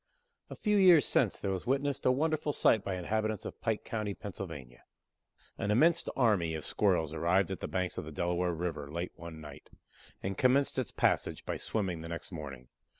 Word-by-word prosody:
A - - -7
few 210 -1 +1
years 180 -6 +7
since - - +2
there 100 - -2
was 95 +4 -4
witnessed 140 +1 0
a - - +6
wonderful 150 +2 0
sight 110 -6 +3
by 95 - -2
inhabitants 110 +3 -2
of - - -8
Pike 115 -2 -1
County, 105 -3 -3
Pa. 105 -1 -7 1.3
An 100 - -1
immense 160 +10 +4
army 100 -10 +2
of 80 - -5
Squirrels 90 -7 +1
arrived 85 +4 +2
at 95 - -4
the - - -4
banks 90 -2 -2
of - - -6
the 80 - -7
Delaware 85 +3 0
river 80 -4 -4
late 85 +3 -3
one 85 -2 -9
night, 75 -3 -11 0.5
and 95 0 -3
commenced 130 +1 +3
its 130 - -2
passage - - 0
by - - -2
swimming 95 -7 -2
the 80 - -7
next 85 +4 -6
morning. 70 -7 -8
95 Hz, 190 wpm, -31 LUFS, 85-125 Hz, 1.3 s, years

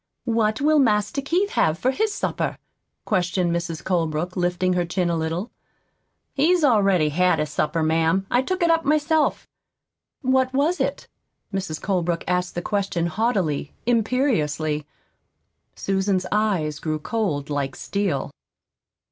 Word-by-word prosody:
"What 220 -2 +1
will 305 +1 +4
Master 220 +1 +2
Keith 355 +8 0
have 160 +1 +2
for 255 - +1
his 430 +8 0
supper?" - - -2 0.5
questioned 180 -3 +1
Mrs. 170 -1 -4
Colebrook, 170 -1 -1
lifting 180 0 +1
her 180 -1 +1
chin 175 0 -1
a - - 0
little. 165 +7 -3 0.8
"He's 330 +4 +3
already 195 - +4
had 180 +4 +2
his 150 -1 -2
supper, 155 +2 0
ma'am. 165 +4 +2
I 245 - +4
took 370 +6 -2
it 335 - +4
up 330 0 +2
myself." 305 +1 +1 0.8
"What 260 0 +2
was 310 +6 +2
it?" - - -2 0.5
Mrs. 190 -5 -3
Colebrook 175 -3 -1
asked 180 0 -1
the 175 - -3
question 200 -4 -1
haughtily, 170 -6 -1
imperiously. 185 - 0 0.9
Susan's 190 -1 0
eyes 185 -9 0
grew 155 0 -2
cold 155 -6 -2
like 140 -2 -2
steel. 195 -9 -2
190 Hz, 135 wpm, -23 LUFS, 165-245 Hz, 0.9 s, will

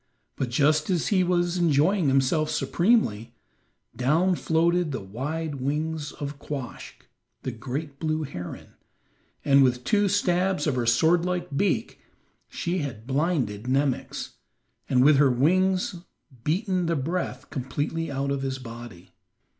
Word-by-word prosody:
But 130 - -2
just 150 +6 +2
as 180 -3 +1
he 190 -3 +3
was 175 0 +1
enjoying 170 +2 +3
himself 135 +3 +2
supremely, 145 - +1 0.6
down 160 +9 +2
floated 170 0 +1
the 130 - -3
wide 140 +8 -4
wings 150 +2 -2
of 145 0 -6
Quoskh, 140 -5 -7 0.4
the 130 - -2
great 140 +5 -6
blue 155 -1 -1
heron, 90 -11 -7 0.8
and 140 -1 +6
with 125 -1 +1
two 205 - +2
stabs 185 -3 +1
of 150 - +1
her 120 -2 -1
sword 160 +8 +4
like 180 -4 -2
beak 200 +8 0 0.5
she 180 +1 -2
had 135 -8 -5
blinded 130 - -1
Nemox, 135 0 -1 0.5
and 125 -1 +4
with 150 -1 +6
her 140 -1 +5
wings 185 +8 +2 0.5
beaten 185 +2 0
the 165 - +1
breath 145 -2 -3
completely 145 +5 -3
out 140 0 -2
of 140 -1 -1
his 135 -1 -2
body. 115 -7 -10
150 Hz, 135 wpm, -26 LUFS, 130-175 Hz, 0.8 s, and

